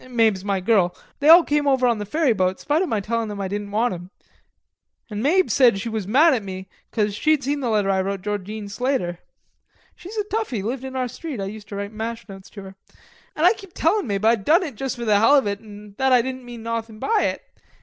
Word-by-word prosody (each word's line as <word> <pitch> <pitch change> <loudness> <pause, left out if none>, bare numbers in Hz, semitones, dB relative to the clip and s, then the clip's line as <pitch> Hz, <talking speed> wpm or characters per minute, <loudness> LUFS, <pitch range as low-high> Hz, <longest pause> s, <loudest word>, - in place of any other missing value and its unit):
Mabe's 220 -6 +2
my 200 -1 0
girl... 185 -2 +2 0.2
they 295 +1 +3
all 335 +2 +10
came 295 -1 0
over 265 -2 +3
on 235 -3 +2
the 205 - -5
ferry 300 +1 +2
boat, 185 -2 0
'spite 295 +3 0
of 375 - -1
my 220 - 0
tellin' 230 +2 -2
'em 205 -1 -6
I 195 - -2
didn't 205 +1 -4
want 220 +3 0
'em. 175 0 -8 1.0
An' 210 0 -3
Mabe 360 +8 +2
said 245 -7 +4
she 230 - -4
was 220 -4 -4
mad 300 +9 +5
at 245 - 0
me, 190 -1 -7 0.2
'cause 210 -2 0
she'd 305 +6 +1
seen 285 +3 -1
the 255 -4 -2
letter 205 -3 +2
I 190 -1 +1
wrote 195 0 -3
Georgine 205 +1 -4
Slater. 205 -5 -2 0.8
She 350 - -12
was 440 - -8
a 420 - +1
toughie, 415 - -3
lived 250 +4 -3
in 265 0 -7
our 255 -1 -1
street, 265 +1 -7
I 195 - -2
used 210 +1 -8
to 205 - -8
write 200 +1 -4
mash 225 +1 -5
notes 195 -2 -11
to. 195 -2 -10 0.6
An' 310 - +1
I 365 - +7
kep' 390 -5 -14
tellin' 345 0 +1
Mabe 200 0 -1
I'd 225 -2 +3
done 335 - +4
it 305 -6 -5
juss 265 +4 -4
for 240 -1 -5
the 210 -2 +4
hell 230 +7 +5
of 275 - +3
it, 200 0 -2
an' 210 -1 -13
that 265 0 +2
I 250 -2 +5
didn't 260 0 -6
mean 240 -2 -9
nawthin' 230 -1 -4
by 430 - +1
it. - - -20
225 Hz, 250 wpm, -22 LUFS, 200-270 Hz, 1.0 s, all